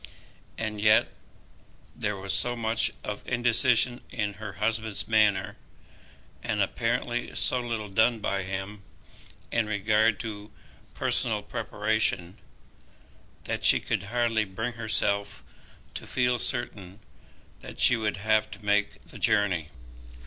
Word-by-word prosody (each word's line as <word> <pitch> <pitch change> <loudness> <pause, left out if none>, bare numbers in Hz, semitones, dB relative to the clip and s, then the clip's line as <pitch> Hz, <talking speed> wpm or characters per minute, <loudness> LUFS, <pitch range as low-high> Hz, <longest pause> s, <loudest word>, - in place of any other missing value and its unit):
And 110 -2 -4
yet 110 0 +4 0.9
there 105 0 -3
was 95 +1 -2
so 120 +5 +2
much 115 -1 +3
of 105 -1 -6
indecision 120 0 +2
in 105 -4 -3
her 105 -3 -6
husband's 110 0 -1
manner, 110 -3 +1 0.8
and 110 -3 -3
apparently 120 +4 -2
so 125 - +2
little 115 -3 -4
done 110 +4 +2
by 100 -2 -2
him 95 +2 -6 0.7
in 115 -2 0
regard 105 +1 +1
to 105 -2 -7 0.5
personal - - +1
preparation, 105 -4 0 1.0
that - - -4
she - - +8
could - - -2
hardly 120 -2 0
bring 110 +5 -5
herself 105 -3 -1 0.5
to - - -8
feel 125 -1 0
certain 105 -6 -4 0.6
that - - -11
she 125 - +8
would 110 -4 -2
have 110 +1 +1
to 105 0 -12
make 105 0 0
the - - -13
journey. 90 -7 +2
110 Hz, 120 wpm, -26 LUFS, 100-115 Hz, 1.0 s, she